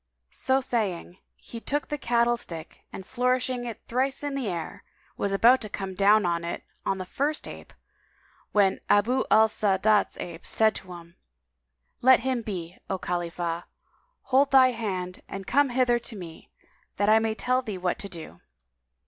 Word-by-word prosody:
So 265 Hz, +1 st, +1 dB
saying, 195 Hz, -8 st, -2 dB, 0.2 s
he 230 Hz, -, -10 dB
took 290 Hz, +5 st, -2 dB
the 295 Hz, -, -2 dB
cattle 235 Hz, -1 st, +2 dB
stick 165 Hz, -8 st, -6 dB
and 190 Hz, -, -8 dB
flourishing 250 Hz, +1 st, 0 dB
it 230 Hz, -2 st, -7 dB
thrice 265 Hz, +4 st, -1 dB
in 290 Hz, -1 st, -2 dB
the 270 Hz, -5 st, -2 dB
air, 170 Hz, -4 st, -5 dB, 0.3 s
was 200 Hz, -, -2 dB
about 235 Hz, +6 st, +5 dB
to 215 Hz, -, -4 dB
come 195 Hz, -1 st, -5 dB
down 205 Hz, +3 st, +4 dB
with 170 Hz, -1 st, 0 dB
it 170 Hz, -, -4 dB, 0.2 s
on 195 Hz, -, +1 dB
the 185 Hz, -, -5 dB
first 285 Hz, +10 st, -2 dB
ape, -, -, -10 dB, 0.8 s
when 200 Hz, -2 st, +3 dB
Abu 240 Hz, +6 st, +3 dB
al 220 Hz, +1 st, +6 dB
Sa'adat's 210 Hz, 0 st, +2 dB
ape 170 Hz, -1 st, -7 dB
said 220 Hz, -1 st, +3 dB
to 185 Hz, -1 st, -10 dB
him, 170 Hz, -1 st, -13 dB, 0.8 s
"Let 260 Hz, +1 st, +6 dB
him 260 Hz, -2 st, -1 dB
be, 180 Hz, -5 st, -6 dB
O 190 Hz, -, -1 dB
Khalifah, 175 Hz, -1 st, -3 dB, 0.6 s
hold 270 Hz, +2 st, +3 dB
thy 260 Hz, -2 st, +6 dB
hand 190 Hz, -6 st, -4 dB
and 195 Hz, 0 st, -6 dB
come 280 Hz, +5 st, +3 dB
hither 245 Hz, -1 st, +2 dB
to 235 Hz, -1 st, -6 dB
me, 170 Hz, -4 st, -10 dB, 0.5 s
that 205 Hz, -, 0 dB
I 220 Hz, +1 st, +6 dB
may 220 Hz, 0 st, -1 dB
tell 255 Hz, +3 st, +1 dB
thee 215 Hz, -6 st, -5 dB
what 180 Hz, -1 st, -2 dB
to 200 Hz, -, -5 dB
do." 160 Hz, -, -9 dB
215 Hz, 170 wpm, -26 LUFS, 185-250 Hz, 0.8 s, al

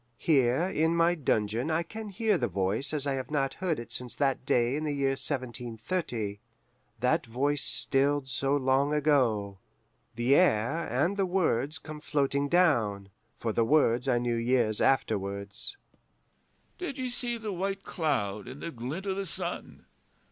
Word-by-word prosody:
Here 135 Hz, -1 st, +3 dB
in 165 Hz, -3 st, +1 dB
my 170 Hz, +1 st, +4 dB
dungeon 115 Hz, -4 st, 0 dB
I 160 Hz, +1 st, +1 dB
can 220 Hz, +5 st, -7 dB
hear 215 Hz, +2 st, +1 dB
the -, -, 0 dB
voice 100 Hz, +7 st, +1 dB
as 150 Hz, -2 st, 0 dB
I 140 Hz, -, 0 dB
have 130 Hz, -2 st, -4 dB
not 140 Hz, -3 st, 0 dB
heard 180 Hz, -4 st, -1 dB
it 115 Hz, 0 st, -9 dB
since 125 Hz, 0 st, -5 dB
that 135 Hz, -2 st, 0 dB
day 125 Hz, -2 st, +2 dB
in 155 Hz, -, -2 dB
the 150 Hz, -, -1 dB
year 140 Hz, -1 st, +1 dB
1730 120 Hz, -, -2 dB, 0.6 s
that -, -, +1 dB
voice 140 Hz, +5 st, 0 dB
stilled 140 Hz, 0 st, +1 dB
so 135 Hz, +2 st, +1 dB
long 135 Hz, +2 st, +2 dB
ago. 120 Hz, -10 st, +1 dB, 0.6 s
The 120 Hz, +4 st, +2 dB
air 145 Hz, -1 st, +3 dB
and 155 Hz, -, +1 dB
the 195 Hz, -1 st, +1 dB
words 155 Hz, -6 st, 0 dB
come 155 Hz, +1 st, -9 dB
floating 140 Hz, -1 st, 0 dB
down 115 Hz, -, +2 dB, 0.3 s
(for 115 Hz, -2 st, -2 dB
the 115 Hz, -, +2 dB
words 125 Hz, -1 st, +3 dB
I 125 Hz, -2 st, +3 dB
knew 120 Hz, 0 st, 0 dB
years 115 Hz, -2 st, +1 dB
afterwards): 100 Hz, -, -1 dB, 1.0 s
'Did 350 Hz, -7 st, -4 dB
ye 260 Hz, -1 st, -2 dB
see 240 Hz, -1 st, -3 dB
the 220 Hz, -3 st, -4 dB
white 195 Hz, +2 st, -3 dB
cloud 105 Hz, -, -2 dB
in 130 Hz, +3 st, -8 dB
the 170 Hz, -, -5 dB
glint 135 Hz, -, -5 dB
o' 195 Hz, -, 0 dB
the 195 Hz, 0 st, -4 dB
sun? -, -, -6 dB
140 Hz, 160 wpm, -29 LUFS, 120-165 Hz, 1.0 s, my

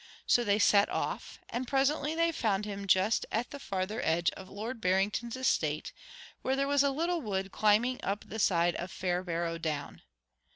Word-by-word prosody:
So 240 Hz, -, +4 dB
they 205 Hz, -2 st, +2 dB
set 205 Hz, -1 st, +5 dB
off, -, -, -3 dB
and 250 Hz, +1 st, -4 dB
presently 285 Hz, +3 st, +1 dB
they 335 Hz, 0 st, +2 dB
found 210 Hz, -9 st, 0 dB
him 200 Hz, -1 st, -5 dB
just 190 Hz, +4 st, +3 dB
at 230 Hz, +2 st, -1 dB
the 285 Hz, -, -7 dB
farther 195 Hz, +1 st, -3 dB
edge 165 Hz, +1 st, +2 dB
of 190 Hz, -, -11 dB
Lord 225 Hz, +4 st, -6 dB
Barrington's 200 Hz, +6 st, 0 dB
estate, 155 Hz, -, 0 dB, 0.5 s
where 265 Hz, -, 0 dB
there 275 Hz, +1 st, 0 dB
was 285 Hz, 0 st, +3 dB
a 280 Hz, -, +3 dB
little 335 Hz, +5 st, -1 dB
wood 195 Hz, -4 st, -3 dB
climbing 215 Hz, +6 st, +2 dB
up 200 Hz, +1 st, -3 dB
the 220 Hz, -, -6 dB
side 175 Hz, -3 st, +3 dB
of 175 Hz, -, -5 dB
Fairbarrow 175 Hz, -2 st, -2 dB
Down. 150 Hz, -3 st, -4 dB
210 Hz, 175 wpm, -31 LUFS, 185-255 Hz, 0.5 s, set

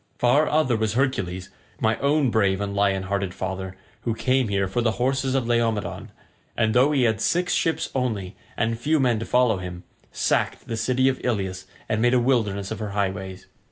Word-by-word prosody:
Far 140 Hz, +5 st, +3 dB
other 150 Hz, -6 st, +2 dB
was 110 Hz, -1 st, 0 dB
Hercules, 95 Hz, -9 st, -1 dB, 0.3 s
my 110 Hz, 0 st, +2 dB
own 140 Hz, -2 st, +2 dB
brave 100 Hz, -3 st, +2 dB
and 100 Hz, -1 st, -3 dB
lion 100 Hz, -1 st, +1 dB
hearted 95 Hz, -1 st, -2 dB
father, 95 Hz, 0 st, -5 dB, 0.2 s
who 115 Hz, -2 st, -2 dB
came 130 Hz, +1 st, +1 dB
here 100 Hz, -1 st, 0 dB
for 110 Hz, +6 st, -1 dB
the 115 Hz, -2 st, +1 dB
horses 130 Hz, +2 st, 0 dB
of 130 Hz, -3 st, +1 dB
Laomedon, 115 Hz, -3 st, -1 dB, 0.5 s
and 110 Hz, -2 st, +2 dB
though 130 Hz, +4 st, +4 dB
he 140 Hz, -4 st, +2 dB
had 110 Hz, -2 st, +1 dB
six 180 Hz, +7 st, +1 dB
ships 165 Hz, -, 0 dB
only, 110 Hz, -8 st, -2 dB, 0.2 s
and 115 Hz, 0 st, 0 dB
few 155 Hz, +5 st, +1 dB
men 120 Hz, -4 st, +2 dB
to 115 Hz, -, -4 dB
follow 125 Hz, -4 st, +3 dB
him, 90 Hz, -1 st, -7 dB, 0.3 s
sacked -, -, -1 dB
the 115 Hz, -, -3 dB
city 130 Hz, +3 st, +1 dB
of 130 Hz, -1 st, -1 dB
Ilius 95 Hz, -6 st, -2 dB, 0.2 s
and 110 Hz, 0 st, 0 dB
made 120 Hz, +1 st, +4 dB
a -, -, +5 dB
wilderness 110 Hz, -6 st, 0 dB
of 110 Hz, -, -4 dB
her 105 Hz, -2 st, -4 dB
highways. 95 Hz, -1 st, -3 dB
115 Hz, 195 wpm, -24 LUFS, 100-130 Hz, 0.5 s, a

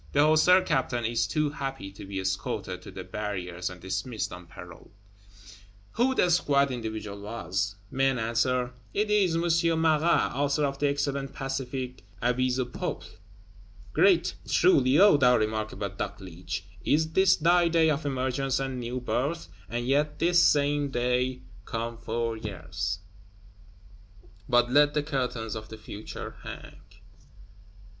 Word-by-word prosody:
The 145 Hz, +1 st, +5 dB
Hussar 180 Hz, +4 st, +6 dB
Captain 130 Hz, -7 st, 0 dB
is 115 Hz, +1 st, +1 dB
too 150 Hz, -2 st, 0 dB
happy 135 Hz, -9 st, -5 dB
to 100 Hz, -, -10 dB
be 95 Hz, 0 st, -4 dB
escorted 95 Hz, +1 st, -3 dB
to -, -, -11 dB
the -, -, -7 dB
barriers 90 Hz, -4 st, -4 dB
and 90 Hz, 0 st, -10 dB
dismissed 95 Hz, +6 st, -3 dB
on 90 Hz, 0 st, -10 dB
parole. 85 Hz, -1 st, -12 dB, 1.0 s
Who 255 Hz, +3 st, +1 dB
the 180 Hz, -, +3 dB
squat 140 Hz, -4 st, +3 dB
individual 110 Hz, -4 st, -5 dB
was? 100 Hz, -2 st, -3 dB, 0.2 s
Men 135 Hz, 0 st, +2 dB
answer, 125 Hz, +2 st, 0 dB, 0.2 s
It 210 Hz, +1 st, +1 dB
is 195 Hz, -5 st, +3 dB
M. 165 Hz, -1 st, +2 dB
Marat, 160 Hz, +1 st, +3 dB
author 145 Hz, +3 st, +1 dB
of 140 Hz, 0 st, -3 dB
the 145 Hz, -, +2 dB
excellent 140 Hz, -1 st, -2 dB
pacific 130 Hz, -1 st, -4 dB, 0.2 s
'Avis 125 Hz, +2 st, +1 dB
au 130 Hz, -, 0 dB
Peuple'! 125 Hz, -, -4 dB, 0.9 s
Great, -, -, +4 dB
truly, 130 Hz, +1 st, +4 dB
O 200 Hz, -4 st, +7 dB
thou 125 Hz, -3 st, +5 dB
remarkable 110 Hz, -1 st, -2 dB
Dogleech, 90 Hz, -2 st, -6 dB, 0.2 s
is 160 Hz, +1 st, +2 dB
this 190 Hz, +2 st, +5 dB
thy 175 Hz, +2 st, +4 dB
day 165 Hz, -1 st, +3 dB
of 150 Hz, +1 st, -1 dB
emergence 135 Hz, -1 st, -1 dB
and 135 Hz, -1 st, -3 dB
new 120 Hz, +1 st, -3 dB
birth; 140 Hz, +6 st, -2 dB, 0.2 s
and 120 Hz, +2 st, -3 dB
yet 145 Hz, +3 st, +1 dB
this 175 Hz, +1 st, +4 dB
same 145 Hz, 0 st, +3 dB
day 125 Hz, 0 st, 0 dB, 0.2 s
come 115 Hz, +1 st, -3 dB
four 115 Hz, 0 st, -2 dB
years! 95 Hz, -3 st, -4 dB, 1.5 s
But 120 Hz, -1 st, +3 dB
let 145 Hz, +2 st, +4 dB
the 150 Hz, -, +1 dB
curtains 125 Hz, -7 st, -2 dB
of 110 Hz, -1 st, -7 dB
the 110 Hz, -, -8 dB
Future 110 Hz, 0 st, -8 dB
hang. -, -, -9 dB
130 Hz, 140 wpm, -27 LUFS, 110-145 Hz, 1.5 s, O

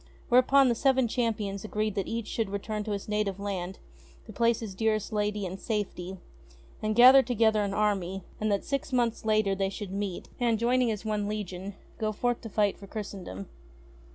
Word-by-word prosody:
Whereupon 255 Hz, +2 st, +6 dB
the 240 Hz, -, +3 dB
Seven 260 Hz, +1 st, +3 dB
Champions 215 Hz, -5 st, -1 dB
agreed 215 Hz, 0 st, -1 dB
that 195 Hz, -2 st, -2 dB
each 230 Hz, -1 st, -3 dB
should 225 Hz, -2 st, -2 dB
return 210 Hz, +2 st, -3 dB
to 215 Hz, -, -3 dB
his 200 Hz, -, -5 dB
native 210 Hz, -2 st, -1 dB
land 190 Hz, -2 st, -4 dB, 0.5 s
to 215 Hz, -, -10 dB
place 230 Hz, +2 st, +2 dB
his 220 Hz, -4 st, -6 dB
dearest 215 Hz, +1 st, 0 dB
lady 210 Hz, -1 st, 0 dB
In 185 Hz, +1 st, -5 dB
safety, 190 Hz, -4 st, -3 dB, 0.6 s
and 215 Hz, 0 st, 0 dB
gather 255 Hz, +3 st, +9 dB
together 225 Hz, -3 st, +2 dB
an 200 Hz, -1 st, -2 dB
army, 195 Hz, -3 st, 0 dB, 0.2 s
and 215 Hz, 0 st, 0 dB
that 200 Hz, -, +1 dB
six 275 Hz, 0 st, -3 dB
months 240 Hz, -3 st, 0 dB
later 215 Hz, -2 st, +2 dB
they 195 Hz, 0 st, 0 dB
should 195 Hz, -1 st, -6 dB
meet, 195 Hz, -2 st, -4 dB
and, 235 Hz, -2 st, +2 dB
joining 245 Hz, +2 st, +2 dB
as 215 Hz, -1 st, -3 dB
one 210 Hz, -1 st, -1 dB
legion, 200 Hz, -2 st, -5 dB, 0.2 s
go 215 Hz, -1 st, 0 dB
forth 245 Hz, +3 st, -1 dB
to 225 Hz, -, -7 dB
fight 205 Hz, -1 st, +1 dB
for 200 Hz, -, -11 dB
Christendom. 190 Hz, -, -6 dB
210 Hz, 185 wpm, -28 LUFS, 200-230 Hz, 0.6 s, gather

